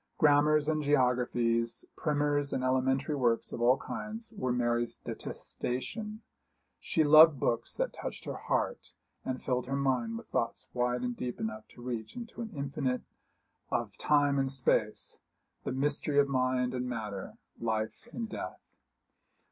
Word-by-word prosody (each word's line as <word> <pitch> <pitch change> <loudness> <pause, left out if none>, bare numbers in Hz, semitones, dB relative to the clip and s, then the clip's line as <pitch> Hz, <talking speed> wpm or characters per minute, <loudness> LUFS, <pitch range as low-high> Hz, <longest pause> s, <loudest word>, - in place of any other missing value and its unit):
Grammars 150 0 +5
and 155 -1 +1
geographies, 125 -4 +2
primers 145 -1 +1
and 130 - -1
elementary 130 +3 +1
works 120 -5 +1
of 120 - -4
all 125 +3 +5
kinds, 220 +9 -6
were 130 -10 -1
Mary's 120 -1 +1
detestation; 210 - -5
but - - -48 0.2
she 160 - +1
loved 155 -1 +8
books 115 - 0
that - - -1
touched - - -6
her - - -4
heart - - -2 0.3
and 130 -1 -3
filled 125 -1 0
her 135 - -1
mind 125 -5 0
with - - -9
thoughts - - -1
wide 125 0 0
and 125 -1 -1
deep 125 0 -4
enough 110 0 -4
to 120 - -14
reach 120 -3 -4
into 235 -1 -6
the 220 - -7
infinite 135 -2 -1 0.7
of - - -1
time 145 -1 +3
and 135 -1 +1
space, 115 -5 0 0.5
the - - -1
mystery 145 +2 +1
of 140 0 +6
mind 130 -1 +1
and 125 0 -2
matter, 105 -5 -5 0.2
life 110 - -2
and 230 -1 -3
death. - - -6
130 Hz, 150 wpm, -31 LUFS, 120-145 Hz, 0.7 s, loved